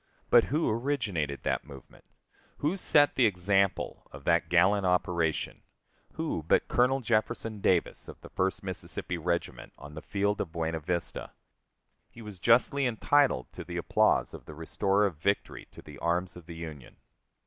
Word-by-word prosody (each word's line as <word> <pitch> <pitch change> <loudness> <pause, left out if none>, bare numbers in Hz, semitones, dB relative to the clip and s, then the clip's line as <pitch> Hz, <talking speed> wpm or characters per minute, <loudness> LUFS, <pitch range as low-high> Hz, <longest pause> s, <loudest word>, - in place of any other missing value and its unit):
But 120 - +7
who 155 +5 0
originated 110 - -1
that - - -1
movement; 70 -3 -14 0.5
who 150 +6 0
set 145 -6 +3
the 125 -4 +4
example 95 0 0
of 70 +1 -11
that 85 0 +2
gallant 95 +4 +4
operation 90 -3 0 0.5
who 160 - -3
but - - +3
Colonel 130 +2 +2
Jefferson 115 -1 -1
Davis, 90 -3 +1
of - - -11
the - - -12
First 95 +1 -1
Mississippi 90 -2 -4
Regiment, 85 -7 -3
on 70 +2 -11
the 80 - -7
field 100 +1 -1
of 85 - -5
Buena 80 -1 -2
Vista? 85 +2 -4 0.8
He 115 - -13
was 105 -4 -9
justly 125 +6 +3
entitled 125 - +2
to - - -7
the - - -6
applause - - +2
of - - -10
the 75 - -10
restorer 95 +6 +1
of 90 -6 -2
victory 100 +6 -2
to - - -14
the 75 -3 -12
arms 90 +2 -1
of 85 -2 -13
the 85 - -8
Union. 80 -6 -9
95 Hz, 160 wpm, -29 LUFS, 80-115 Hz, 0.8 s, But